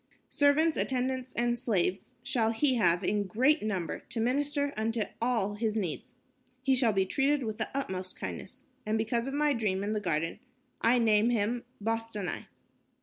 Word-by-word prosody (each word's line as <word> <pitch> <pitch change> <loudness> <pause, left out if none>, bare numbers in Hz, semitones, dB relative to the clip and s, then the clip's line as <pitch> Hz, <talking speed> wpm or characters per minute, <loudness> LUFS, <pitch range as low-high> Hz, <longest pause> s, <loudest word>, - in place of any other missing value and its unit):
"Servants, 300 +3 +3
attendants 260 0 -1
and 240 0 +1
slaves 195 -6 -1
shall 225 -3 +1
he 265 +4 +2
have 175 -3 +3
in 205 +1 0
great 260 - +3
number 190 -7 -2
to 230 - -6
minister 285 +4 0
unto 220 +1 0 0.2
all 230 -4 +1
his 215 +1 -1
needs. 185 -8 -3 0.5
He 265 0 +3
shall 250 -3 +3
be 195 -2 +2
treated 275 +6 +1
with 220 -1 -4
the 220 - 0
utmost 190 -9 -4
kindness. - - -7 0.2
And 215 +1 0
because 235 +2 0
of 270 - -3
my 295 0 +3
dream 205 -5 -1
in 205 - -1
the 215 - 0
garden, 165 -2 -1 0.4
I 235 +2 +4
name 220 -1 +4
him 235 +1 0
Bostanai." 225 -3 -3
225 Hz, 165 wpm, -30 LUFS, 205-260 Hz, 0.5 s, I